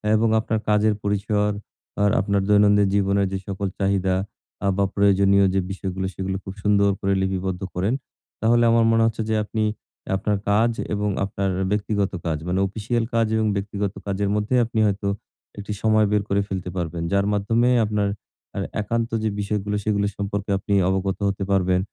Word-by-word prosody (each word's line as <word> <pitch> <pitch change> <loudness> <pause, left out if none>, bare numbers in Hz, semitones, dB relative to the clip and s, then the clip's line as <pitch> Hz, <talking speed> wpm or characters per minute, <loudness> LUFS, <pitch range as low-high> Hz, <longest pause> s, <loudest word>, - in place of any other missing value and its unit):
এবং 110 +1 +2
আপনার 110 0 -1
কাজের 105 +1 +3
পরিসর 105 +1 0 0.5
আর 105 - +4
আপনার 100 0 +1
দৈনন্দিন 105 0 +5
জীবনের 100 0 +2
যে - - 0
সকল 100 0 -3
চাহিদা 95 -1 +1 0.5
আ - - +2
বা 100 - +3
প্রয়োজনীয় 100 0 +4
যে 95 - +2
বিষয়গুলো 95 -1 -4
সেগুলো 95 0 -3
খুব 95 - -7
সুন্দর 100 -1 +3
করে 100 0 0
লিপিবদ্ধ 95 -1 -2
করেন। 95 +6 0 0.5
তাহলে 120 +1 +4
আমার 115 0 +4
মনে 115 0 +4
হচ্ছে 115 0 -1
যে, 110 - +2
আপনি 110 +1 -2 0.5
আপনার 105 +2 0
কাজ 115 +3 +3 0.2
এবং 105 0 0 0.2
আপনার 100 0 -2
আ - - -1
ব্যক্তিগত 105 -1 0
কাজ 80 -2 0
মানে 90 +1 0
অফিসিয়াল 110 +4 -2
কাজ 115 -1 +2
এবং 110 0 +1
ব্যক্তিগত 100 0 -3
কাজের 100 0 -1
মধ্যে 105 +4 0
আপনি 115 0 -3
হয়তো 100 0 -2 0.5
একটি 100 +1 -5
সময় 110 -1 +4
বের 105 -1 +2
করে 100 +1 +2
ফেলতে 95 -2 -4
পারবেন। 85 -1 -3
যার 100 0 +2
মাধ্যমে 115 +4 +2 0.2
আপনার 105 -1 0 0.5
এ - - 0 0.2
একান্ত 115 +2 -1
যে 110 - +1
বিষয়গুলো, 105 0 -2
সেগুলো 100 -1 +1
সম্পর্কে 100 0 -3
আপনি 100 +1 -3 0.2
অবগত 95 0 -1
হতে 100 0 -2
পারবেন। 90 -1 +2
100 Hz, 170 wpm, -23 LUFS, 95-105 Hz, 0.5 s, দৈনন্দিন